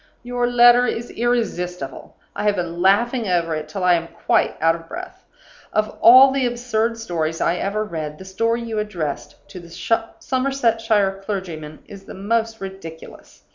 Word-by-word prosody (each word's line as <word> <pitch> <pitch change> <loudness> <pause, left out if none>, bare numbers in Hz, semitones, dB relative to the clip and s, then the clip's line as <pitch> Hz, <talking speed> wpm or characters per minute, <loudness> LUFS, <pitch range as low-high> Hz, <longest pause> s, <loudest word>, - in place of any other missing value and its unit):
Your 245 0 -1
letter 245 0 +6
is 235 +1 -4
irresistible; 180 - -3 0.2
I - - -3
have 205 -1 +3
been 175 -1 -4
laughing 225 +5 +2
over 170 -3 0
it 155 0 -4
till 185 +4 -4
I 180 -1 +5
am 165 -1 0
quite - - 0
out 165 +1 +4
of 165 0 -9
breath. 365 - -9 0.5
Of 215 0 -1
all 260 +3 +9
the 265 -2 +1
absurd 235 -1 -1
stories 165 -7 -3
I 170 - +1
ever 210 +3 -1
read, 155 -6 -5
the 190 - -11
story 230 +5 -1
you 225 -2 -3
addressed 170 -9 -4
to 185 - -9
the 170 -1 -13
Somersetshire 225 -2 0
clergyman 170 -7 -6
is 200 -2 -12
the - - -10
most 225 +3 -1
ridiculous. 190 -4 -10
205 Hz, 165 wpm, -21 LUFS, 175-235 Hz, 0.5 s, all